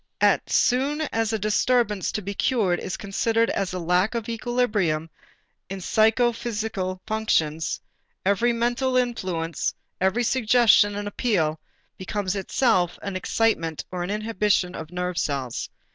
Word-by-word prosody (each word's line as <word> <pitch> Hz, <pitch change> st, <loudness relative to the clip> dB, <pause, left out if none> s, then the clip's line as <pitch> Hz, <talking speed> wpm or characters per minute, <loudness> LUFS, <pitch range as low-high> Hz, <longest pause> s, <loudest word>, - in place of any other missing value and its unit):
As -, -, +4 dB
soon 275 Hz, +5 st, +2 dB
as 225 Hz, -1 st, +1 dB
a 220 Hz, -, 0 dB
disturbance 215 Hz, -1 st, +1 dB
to 210 Hz, -, -3 dB
be 200 Hz, +2 st, -4 dB
cured 200 Hz, -6 st, +1 dB
is 190 Hz, 0 st, -4 dB
considered 225 Hz, +3 st, 0 dB
as 195 Hz, -1 st, -1 dB
a 185 Hz, -, -3 dB
lack 180 Hz, +5 st, +1 dB
of 230 Hz, -1 st, -3 dB
equilibrium 215 Hz, -9 st, 0 dB, 0.6 s
in 195 Hz, 0 st, -5 dB
psychophysical 220 Hz, -2 st, 0 dB
functions, 165 Hz, -8 st, 0 dB, 0.5 s
every 200 Hz, +5 st, +3 dB
mental 240 Hz, +2 st, 0 dB
influence, 185 Hz, -10 st, -1 dB, 0.3 s
every 190 Hz, +6 st, +2 dB
suggestion 230 Hz, -4 st, +4 dB
and 205 Hz, 0 st, -4 dB
appeal 180 Hz, -8 st, 0 dB, 0.4 s
becomes 190 Hz, 0 st, -2 dB
itself 190 Hz, -3 st, +1 dB
an 200 Hz, -1 st, -4 dB
excitement 185 Hz, -5 st, 0 dB
or 180 Hz, -1 st, -3 dB
an 175 Hz, -, -3 dB
inhibition 210 Hz, -3 st, 0 dB
of 160 Hz, -3 st, -7 dB
nerve 180 Hz, 0 st, -3 dB
cells. 135 Hz, -4 st, -2 dB
205 Hz, 130 wpm, -24 LUFS, 180-230 Hz, 0.6 s, As